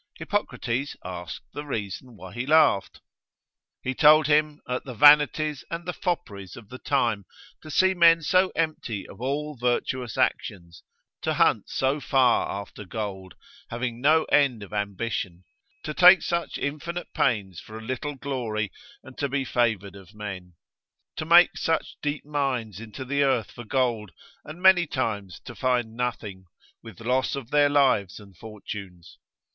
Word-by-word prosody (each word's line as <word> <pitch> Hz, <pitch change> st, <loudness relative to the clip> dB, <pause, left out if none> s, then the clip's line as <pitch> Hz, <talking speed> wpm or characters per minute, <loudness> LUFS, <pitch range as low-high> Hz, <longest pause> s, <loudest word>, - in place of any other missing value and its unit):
Hippocrates 135 Hz, -, -2 dB
asked 90 Hz, -2 st, -7 dB
the 145 Hz, -, -5 dB
reason 115 Hz, -2 st, -5 dB
why 95 Hz, -2 st, -11 dB
he 120 Hz, +2 st, -4 dB
laughed. 150 Hz, -10 st, +3 dB, 0.8 s
He 130 Hz, -, -2 dB
told 155 Hz, +2 st, +6 dB
him, 150 Hz, 0 st, +2 dB
at 125 Hz, 0 st, -3 dB
the 125 Hz, -3 st, -8 dB
vanities 150 Hz, +1 st, +5 dB
and 170 Hz, 0 st, -5 dB
the 180 Hz, -, -3 dB
fopperies 105 Hz, -, -4 dB
of 110 Hz, -3 st, -13 dB
the 130 Hz, -, -9 dB
time, 115 Hz, -8 st, 0 dB, 0.4 s
to 155 Hz, -, -11 dB
see 190 Hz, +5 st, +3 dB
men 165 Hz, -2 st, +5 dB
so 185 Hz, +4 st, +3 dB
empty 155 Hz, -11 st, -2 dB
of -, -, -13 dB
all 145 Hz, +3 st, -2 dB
virtuous 125 Hz, 0 st, -2 dB
actions, 85 Hz, -4 st, -2 dB, 0.4 s
to -, -, -1 dB
hunt -, -, +2 dB
so 135 Hz, +3 st, 0 dB
far 130 Hz, -4 st, +2 dB
after 100 Hz, +1 st, -7 dB
gold, 95 Hz, -2 st, -6 dB, 0.3 s
having 120 Hz, 0 st, -4 dB
no 155 Hz, +3 st, +4 dB
end 135 Hz, -7 st, +2 dB
of 100 Hz, -, -12 dB
ambition; 100 Hz, -3 st, -3 dB, 0.4 s
to 150 Hz, -, -4 dB
take 180 Hz, +1 st, +7 dB
such 170 Hz, -1 st, -2 dB
infinite 165 Hz, +5 st, -5 dB
pains 100 Hz, -8 st, 0 dB
for 110 Hz, -, -10 dB
a -, -, -8 dB
little 130 Hz, +4 st, -4 dB
glory, 115 Hz, -7 st, -3 dB, 0.3 s
and 130 Hz, -, -13 dB
to 140 Hz, -, -1 dB
be 135 Hz, 0 st, -1 dB
favoured 110 Hz, -6 st, 0 dB
of 100 Hz, +1 st, -15 dB
men; 95 Hz, -4 st, -8 dB, 0.6 s
to 155 Hz, -, -4 dB
make 170 Hz, +2 st, +6 dB
such 160 Hz, -1 st, -1 dB
deep 145 Hz, 0 st, -3 dB
mines 130 Hz, -9 st, -2 dB
into 115 Hz, +4 st, -8 dB
the 140 Hz, +2 st, 0 dB
earth 130 Hz, -5 st, +1 dB
for 120 Hz, -, -10 dB
gold, 120 Hz, -5 st, 0 dB, 0.3 s
and 160 Hz, +4 st, -11 dB
many 185 Hz, -3 st, +6 dB
times 105 Hz, -, -3 dB
to -, -, -10 dB
find 120 Hz, -3 st, -1 dB
nothing, 110 Hz, -6 st, -4 dB, 0.4 s
with 115 Hz, -4 st, -12 dB
loss 130 Hz, +4 st, 0 dB
of 135 Hz, -3 st, -8 dB
their 145 Hz, -1 st, +4 dB
lives 130 Hz, -10 st, +2 dB
and 100 Hz, -3 st, -16 dB
fortunes. 100 Hz, -4 st, -10 dB
125 Hz, 155 wpm, -25 LUFS, 105-150 Hz, 0.8 s, take